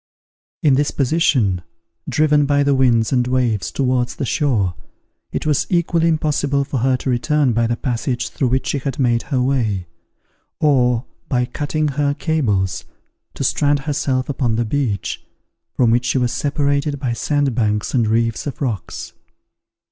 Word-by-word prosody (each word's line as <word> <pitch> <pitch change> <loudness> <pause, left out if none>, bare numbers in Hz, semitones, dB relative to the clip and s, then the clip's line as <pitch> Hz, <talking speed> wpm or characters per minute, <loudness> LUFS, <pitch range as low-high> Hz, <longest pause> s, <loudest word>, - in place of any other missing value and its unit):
In 145 - +5
this 145 +2 +2
position, 130 - +1 0.5
driven 150 -1 +3
by 145 0 +3
the 140 0 +2
winds 120 -3 +3
and 125 -1 +2
waves 125 -5 0
towards 125 -2 0
the 140 - -3
shore, 115 - +1 0.6
it - - -3
was 150 -3 +1
equally 170 -2 +2
impossible 145 -3 +1
for 135 - -4
her 130 +2 +2
to 130 - -4
return 140 +1 +1
by 115 +1 +2
the 120 - 0
passage 125 0 -2
through 135 - -1
which 130 +2 0
she 140 - -1
had 135 -1 -4
made 120 -3 +2
her 130 - +1
way; 120 -8 0 0.7
or, 125 -5 +2 0.2
by 125 -2 +1
cutting 150 +4 -2
her 145 0 0
cables, 110 - 0 0.5
to - - -3
strand 145 -1 +2
herself 135 -3 -1
upon 125 -5 0
the 120 +1 0
beach, 115 -4 -2 0.5
from 120 -3 +3
which 120 +1 +2
she 130 - +1
was 125 -2 +1
separated 145 0 0
by 130 -4 -1
sandbanks 120 -6 0
and 120 -4 +2
reefs 115 +3 0
of 140 - -5
rocks. 115 - -4
130 Hz, 155 wpm, -19 LUFS, 120-145 Hz, 0.7 s, In